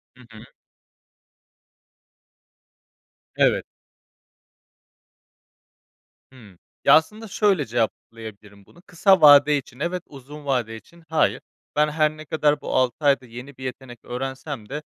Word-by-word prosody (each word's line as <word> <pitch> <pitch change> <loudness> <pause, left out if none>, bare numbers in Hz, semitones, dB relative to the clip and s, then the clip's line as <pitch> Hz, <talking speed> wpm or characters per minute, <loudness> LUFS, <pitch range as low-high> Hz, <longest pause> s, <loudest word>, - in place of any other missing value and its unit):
Hı 125 - -18
hı. 110 +1 -13 2.9
Evet. - - +2 2.7
Hımm. 105 -9 -17 0.3
Ya - - +7
aslında 215 +8 0
şöyle 195 -6 +1
cevaplayabilirim 110 -3 -5
bunu, 175 - -21
kısa 190 +1 +2
vade 145 0 +7
için 130 -1 -10
evet, 175 +2 -3
uzun 145 +2 -12
vade 125 -5 -1
için 170 +10 -16
hayır. 160 - +1 0.3
Ben 150 +1 +2
her 155 0 0
ne 155 - -10
kadar 150 -1 0
bu - - -4
6 130 +3 0
ayda 140 -2 +3
yeni 125 +4 -11
bir 130 - -11
yetenek 125 -2 -8
öğrensem 130 -1 -6
de 150 +2 -5
140 Hz, 115 wpm, -23 LUFS, 120-155 Hz, 2.9 s, Ya